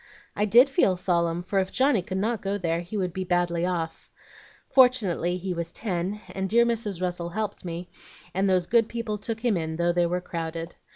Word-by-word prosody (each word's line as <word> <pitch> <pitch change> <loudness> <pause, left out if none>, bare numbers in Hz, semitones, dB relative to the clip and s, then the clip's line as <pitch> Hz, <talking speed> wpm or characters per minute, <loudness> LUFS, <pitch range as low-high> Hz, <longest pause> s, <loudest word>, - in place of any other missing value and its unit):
"I 205 - +1
did 235 +6 +7
feel 270 - +2
solemn, 170 -1 0
for 195 +2 0
if 190 -1 -1
Johnny 260 -5 +3
could 185 +1 -4
not 220 +2 -1
go 200 +1 -1
there 170 -3 -1
he 180 +5 -6
would 180 -3 -1
be 190 - -3
badly 175 -1 0
off. 165 -3 -3 0.6
Fortunately 210 -9 +3
he 185 0 -3
was 170 -1 -4
ten, 190 0 -3
and 190 0 -3
dear 235 +3 +5
Mrs. 215 -6 -2
Russell 175 -1 -2
helped 210 +2 -4
me, 175 0 -5 0.5
and 195 +1 +1
those 185 -2 +2
good 230 +3 +3
people 230 -3 -3
took 225 +1 -4
him 230 -4 +3
in 160 -2 -2
though 170 +1 +1
they 175 0 +2
were 180 +1 -1
crowded. 165 -1 -5
185 Hz, 205 wpm, -26 LUFS, 175-215 Hz, 0.6 s, did